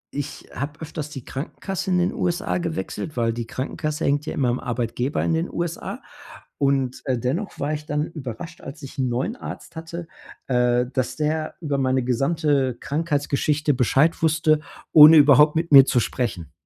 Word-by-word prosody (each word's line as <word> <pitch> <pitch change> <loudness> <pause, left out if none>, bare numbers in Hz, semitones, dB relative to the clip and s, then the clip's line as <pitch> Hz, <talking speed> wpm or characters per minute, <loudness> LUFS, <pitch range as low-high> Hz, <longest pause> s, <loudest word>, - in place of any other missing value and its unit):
ich 145 0 -5
habe 150 +2 -5
öfters 155 -1 -6
die 135 -5 -9
Krankenkasse 190 +7 -5
in 180 - +2
den 175 +1 +1
USA 180 +1 -1
gewechselt, 160 -3 -4
weil 115 -1 +1
die 115 -1 -5
Krankenkasse 150 +5 -3
hängt 145 +2 0
ja - - -2
immer 130 -3 +1
am 120 - -1
Arbeitgeber 125 +2 -2
in 165 - +1
den 165 +2 -1
USA. 170 -1 -4 0.5
Und, 135 -2 0
äh, 130 -3 0
dennoch 160 - -3
war 150 +2 -1
ich 150 0 -6
dann 150 0 -1
überrascht, 155 +2 -8
als 140 +3 -9
ich 135 - -9
'n 130 -2 0
neuen 135 - -2
Arzt - - -9
hatte, 165 +1 -7 0.4
äh, 125 -1 +2
dass 130 -2 -1
der 155 0 -2
über 150 -4 -1
meine 130 -1 +1
gesamte 135 +1 +1
Krankheitsgeschichte 145 -1 0
Bescheid 135 +7 +2
wusste, 155 -1 +3 0.3
ohne 155 +1 +10
überhaupt 150 +2 +6
mit 165 -1 -1
mir 135 -1 +10
zu 125 - +2
sprechen. 110 -9 -3
145 Hz, 175 wpm, -23 LUFS, 130-160 Hz, 0.5 s, ohne